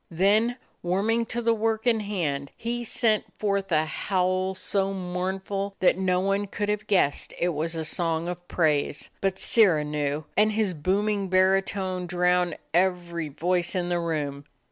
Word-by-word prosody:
Then, 210 +7 +2 0.2
warming 215 +6 +1
to 240 +1 -2
the 230 0 +3
work 220 0 -1
in 235 -2 +3
hand, 160 -10 -2
he 240 +1 -3
sent 220 -2 +2
forth 200 -2 -1
a 155 -1 +3
howl 185 +2 0
so 195 +1 -1
mournful 190 +2 -3
that 185 - +4
no 185 -1 +1
one 195 +2 0
could 205 +1 -3
have 210 +1 -2
guessed 180 -8 +1
it 175 - +1
was 165 +1 -2
a 160 -1 -2
song 165 +1 -1
of 175 0 -6
praise. 150 -4 0
But 195 -1 0
Sirrah 185 -9 +4
knew, 150 0 -2
and 215 +2 +3
his 210 -3 +1
booming 195 +5 0
baritone 185 0 +1
drowned 180 -1 +1 0.2
every 175 -2 0
voice 175 +5 -1
in 175 -1 -1
the 175 0 +1
room. 145 -4 -3
185 Hz, 160 wpm, -26 LUFS, 170-200 Hz, 0.2 s, that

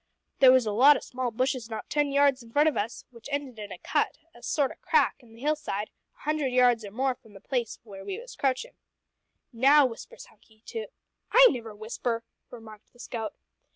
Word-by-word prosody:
There 260 -1 +8
was 255 -2 +4
a 215 - -1
lot 265 +7 +6
o' - - -5
small 255 -1 -4
bushes 250 0 -2
not 220 - -6
ten 295 -1 0
yards 280 -1 +3
in 230 -1 -15
front 295 +5 +4
of 310 - +1
us, 215 +3 -3
which 235 +2 -12
ended 275 -5 -4
in 205 -1 -7
a - - -7
cut - - -1 0.2
a 240 - -17
sort 275 +2 0
o' - - -14
crack 310 -7 +2
in 225 -2 -18
the 230 - -15
hill 300 +2 +2
side, 210 -8 -5 0.2
a - - -25
hundred 305 -1 0
yards 250 -2 +3
or 205 - -7
more 260 +5 0
from 220 -4 -21
the 195 - -12
place 240 +2 -3
where 195 -4 -11
we 385 - -5
was - - -11
crouchin'. 275 - -1 0.8
"`Now,' 275 +4 +6
whispers 230 -2 -10
Hunky 220 0 -25
to 450 -1 -5 0.2
" - - -51
"I - - +9
never 230 -5 -6
whisper!" 230 +2 -3 0.3
remarked 220 -3 -13
the 245 - -23
scout. 225 -3 -5
250 Hz, 220 wpm, -27 LUFS, 225-285 Hz, 0.8 s, I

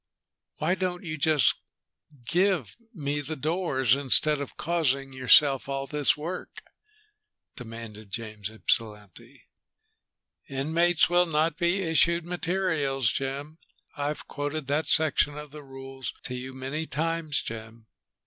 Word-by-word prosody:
"Why 180 - +1
don't 185 -1 -2
you 160 -3 -4
just 150 -3 +3 0.6
give 175 - +1 0.2
me 145 - -2
the 150 +3 -5
doors, 145 - +1
instead 145 +2 +4
of 140 - -7
causing 140 -5 0
yourself 135 +2 +5
all 135 0 -2
this 150 0 +2
work?" 170 +5 -6 0.9
demanded 115 -4 -9
James 105 -1 -4
Ypsilanti. 105 -3 -3 1.1
"'Inmates 160 +5 +2
will 175 0 +3
not 160 0 +1
be 175 +3 +1
issued 170 +1 +3
materials,' 165 - 0
Jim. 140 +4 -4 0.4
I've 145 +1 -3
quoted 145 +1 -3
that 145 +4 0
section 150 -1 +2
of 150 -1 -8
the 150 0 -9
rules 135 -1 -7
to 125 - -5
you 125 +1 -5
many 135 +5 -4
times, 160 0 -1
Jim." 110 0 -8
145 Hz, 120 wpm, -27 LUFS, 130-165 Hz, 1.1 s, yourself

